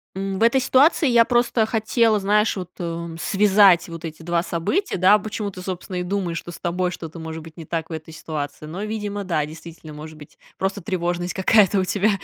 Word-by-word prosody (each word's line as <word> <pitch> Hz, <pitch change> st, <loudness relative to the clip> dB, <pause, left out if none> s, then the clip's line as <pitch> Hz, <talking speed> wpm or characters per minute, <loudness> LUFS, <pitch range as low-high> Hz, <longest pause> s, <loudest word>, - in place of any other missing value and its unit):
м, 195 Hz, 0 st, -3 dB
в -, -, -7 dB
этой 235 Hz, +3 st, +4 dB
ситуации 280 Hz, +4 st, +4 dB
я 235 Hz, -2 st, +5 dB
просто 240 Hz, -2 st, +2 dB
хотела, 225 Hz, 0 st, +2 dB
знаешь, 210 Hz, +1 st, +2 dB
вот, 180 Hz, -1 st, -6 dB
э, 170 Hz, -1 st, -4 dB
связать 195 Hz, -2 st, +4 dB
вот 165 Hz, 0 st, -9 dB
эти 165 Hz, 0 st, -7 dB
2 170 Hz, 0 st, 0 dB
события, 180 Hz, -, -1 dB
да, 190 Hz, +4 st, +5 dB
почему 210 Hz, 0 st, -4 dB
ты, 185 Hz, -, -9 dB
собственно, 185 Hz, 0 st, -5 dB
и -, -, -1 dB
думаешь, 180 Hz, -2 st, -2 dB
что -, -, -11 dB
с 170 Hz, -, -11 dB
тобой 180 Hz, +1 st, -1 dB
что-то 165 Hz, -1 st, -8 dB
может 160 Hz, 0 st, -7 dB
быть 160 Hz, 0 st, -13 dB
не 165 Hz, -, -9 dB
так 165 Hz, +1 st, -4 dB
в -, -, -4 dB
этой 160 Hz, 0 st, -7 dB
ситуации. 155 Hz, -2 st, -6 dB
Но, 170 Hz, +6 st, -6 dB
видимо, 210 Hz, -1 st, -4 dB
да, 155 Hz, -5 st, 0 dB
действительно, 160 Hz, 0 st, -11 dB
может 155 Hz, +1 st, -10 dB
быть, 150 Hz, -, -15 dB, 0.2 s
просто 195 Hz, +1 st, -2 dB
тревожность 175 Hz, 0 st, -2 dB
какая-то 195 Hz, 0 st, +4 dB
у -, -, +1 dB
тебя. 200 Hz, +3 st, +1 dB
180 Hz, 210 wpm, -22 LUFS, 165-210 Hz, 0.2 s, я